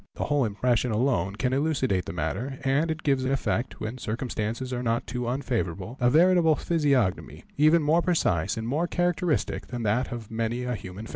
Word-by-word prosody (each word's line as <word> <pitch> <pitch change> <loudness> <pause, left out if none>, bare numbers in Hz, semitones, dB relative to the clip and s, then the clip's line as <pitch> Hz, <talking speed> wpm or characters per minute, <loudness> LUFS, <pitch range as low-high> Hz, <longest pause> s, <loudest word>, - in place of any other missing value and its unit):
The - - -2
whole 145 -3 +1
impression 120 +3 0
alone 105 -5 +1
can 125 +4 -1
elucidate 135 - 0
the - - -5
matter, 95 - -3
and 140 +4 +1
it 160 0 -3
gives 135 -3 +2
in 130 - 0
effect, 120 -3 -1
when 110 +4 -5
circumstances 115 +2 -3
are 125 - -2
not 115 -1 0
too 125 -1 -4
unfavourable, 120 -5 -2
a 120 -1 +4
veritable 165 +2 +5
physiognomy, 140 - 0
even 155 +2 +4
more 160 +4 +3
precise 100 - +1
and 110 0 -3
more 155 +8 0
characteristic 175 -2 0
than 120 -2 -5
that 110 +4 0
of 115 -3 -7
many 115 +2 -2
a 125 0 -2
human 100 -1 -7
face. - - -11
125 Hz, 190 wpm, -26 LUFS, 110-145 Hz, -, veritable